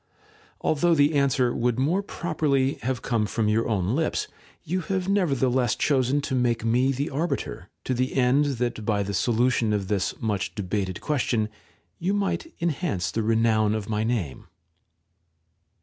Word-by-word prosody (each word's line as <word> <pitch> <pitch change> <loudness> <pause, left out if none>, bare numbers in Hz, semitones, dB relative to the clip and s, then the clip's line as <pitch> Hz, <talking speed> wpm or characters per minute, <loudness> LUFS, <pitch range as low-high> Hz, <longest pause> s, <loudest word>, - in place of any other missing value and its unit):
Although 165 +2 +2
the 145 +1 +4
answer 140 -3 +2
would 120 0 0
more 160 +9 +1
properly 150 -8 -1
have 125 -2 -2
come 110 -3 0
from 110 0 -1
your 110 +2 +1
own 100 +1 0
lips, 160 +1 0 0.4
you 185 +4 -2
have 190 +1 -2
nevertheless 135 - +2
chosen 135 0 +1
to 140 - -4
make 120 -3 +1
me 125 +4 +3
the 140 +3 -2
arbiter, 145 - -3
to 130 - -1
the 130 +1 -1
end 135 +3 +3
that 120 -2 -2
by 105 -1 +1
the 100 +1 -4
solution 115 +1 +2
of 100 -2 -2
this 100 -2 -1
much 105 -3 -2
debated 95 -2 -3
question 120 -7 0 0.5
you 190 +4 0
might 205 - -1
en 170 - +1
hance 140 - -2
the 115 - -1
renown 110 -1 +2
of 110 -1 -4
my 105 0 0
name. 110 - -2
125 Hz, 160 wpm, -25 LUFS, 110-145 Hz, 0.5 s, the